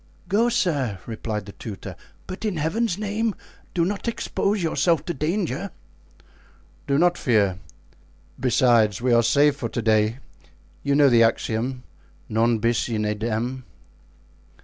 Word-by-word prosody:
"Go, 215 +6 +2
sir," 140 - 0
replied 110 -2 -4
the 100 - -9
tutor; 100 -1 -8 0.3
"but 185 +3 -7
in 205 -6 -1
Heaven's 175 +6 0
name 215 +1 -1 0.4
do 170 -2 +2
not 200 +4 -3
expose 205 -3 -1
yourself 165 -1 +1
to 175 - -2
danger!" 170 +3 -2 1.2
"Do 140 -1 +2
not 175 +2 +3
fear. 100 - +2 0.8
Besides, 120 -5 +3
we 125 0 +1
are 115 - +6
safe 140 +5 +3
for 115 -5 -3
to 120 - -3
day; 110 +1 +2 0.6
you 140 0 +1
know 145 -1 +6
the 120 -3 +5
axiom, 115 +2 0 0.5
'Non 115 +2 +2
bis 115 +2 0
in 110 -2 -1
idem. 115 +4 -2
130 Hz, 135 wpm, -24 LUFS, 115-175 Hz, 1.2 s, are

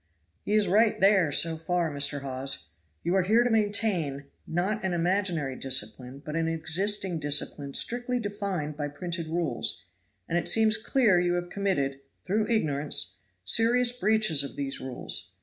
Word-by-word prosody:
"He 205 - -2
is 215 -2 +3
right 215 +4 +3
there 195 -5 +4
so 165 +3 +3
far, 165 0 -1
Mr. 145 0 -1
Hawes. 130 - -3 0.3
You 175 - 0
are 190 - +3
here 220 +6 +3
to 245 - 0
maintain, 205 -10 0 0.2
not 190 +6 -1
an 190 -1 -1
imaginary 175 -5 0
discipline, 130 +1 -3
but 150 - -5
an 165 0 0
existing 175 +3 +1
discipline 145 -1 -1
strictly 245 +1 0
defined 200 -8 -4
by 145 -1 -3
printed 170 +2 -5
rules, 155 -11 -1 0.4
and 170 - 0
it 175 - -4
seems 220 +3 +4
clear 220 -5 +3
you 175 0 +1
have 175 0 -4
committed 140 -9 -1 0.3
(through 210 +3 0
ignorance) 150 -10 0 0.3
serious 240 +2 +4
breaches 215 - +2
of 140 - -8
these 140 -1 -4
rules. 130 -1 -3
175 Hz, 155 wpm, -27 LUFS, 145-210 Hz, 0.4 s, there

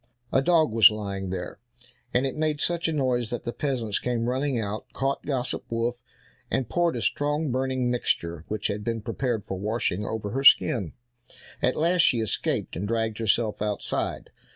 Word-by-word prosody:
A 135 - +5
dog 160 -3 +3
was 110 -1 +8
lying 100 -3 -4
there, 90 0 -5 0.5
and 125 +2 +2
it 135 - -2
made 155 -1 0
such 170 +2 0
a - - 0
noise 125 -6 0
that 120 - -4
the 120 - -4
peasants 120 -8 -1
came 120 -1 -1
running 130 0 0
out, 105 0 -4
caught 135 +1 -1
Gossip 130 -3 -1
Wolf, 120 +1 -1 0.5
and 130 - 0
poured 170 +4 +1
a - - -3
strong 145 0 0
burning 130 -1 0
mixture, 85 -9 -1
which 105 -1 -4
had 105 0 -1
been 115 0 -2
prepared 120 -2 -2
for 95 - -4
washing, 105 -1 -1
over 105 -1 -4
her 135 +2 -2
skin. 105 - +5 0.7
At 125 - +2
last 170 +3 +3
she 125 -6 +4
escaped, 110 -2 -1
and 95 +5 -3
dragged 110 -1 -1
herself 110 -1 +1
outside. 105 -1 -2
120 Hz, 175 wpm, -26 LUFS, 105-135 Hz, 0.7 s, was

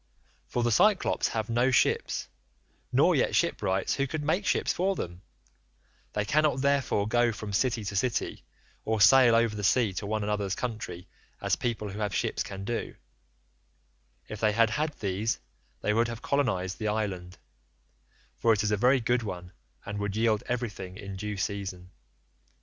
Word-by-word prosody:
For 120 - -1
the 120 - +2
Cyclopes 205 - +3
have 110 -1 -2
no 120 +2 +2
ships, 130 - +1 0.6
nor - - +4
yet - - +1
shipwrights 95 +1 +1
who 140 0 0
could 155 +2 -4
make 175 +7 0
ships - - +1
for 190 +2 0
them; 85 - -6 0.9
they 105 -1 -1
cannot 150 +1 +2
therefore 140 -7 +1
go 120 +1 +3
from 105 -1 -6
city 115 +1 +1
to 100 0 -4
city, 120 +4 -1 0.4
or 110 0 0
sail 120 +2 +7
over 115 -2 +2
the 105 - -5
sea 110 0 +3
to 100 +2 -4
one 110 0 -1
another's 100 -2 -1
country 100 -7 -5 0.3
as - - +1
people 110 -3 -3
who 100 - -7
have 105 -2 -1
ships - - -1
can 95 0 -5
do; 120 +2 -3 1.3
if 105 - -7
they 110 -1 +2
had 115 0 +3
had 150 +5 0
these 100 +3 -1 0.4
they 105 - +1
would 115 +2 +2
have 115 -1 -7
colonised 110 -10 0
the 110 - -2
island,78 95 -4 -3 1.0
for 115 - +4
it 105 -1 0
is 105 - 0
a 105 - +2
very 125 +5 +4
good 120 +1 +1
one, 90 -4 -6 0.3
and 105 0 -4
would 100 -1 -2
yield 110 -1 +2
everything 105 -6 -4
in 100 -2 -7
due 105 +1 -4
season. 95 -2 -4
110 Hz, 170 wpm, -28 LUFS, 100-120 Hz, 1.3 s, sail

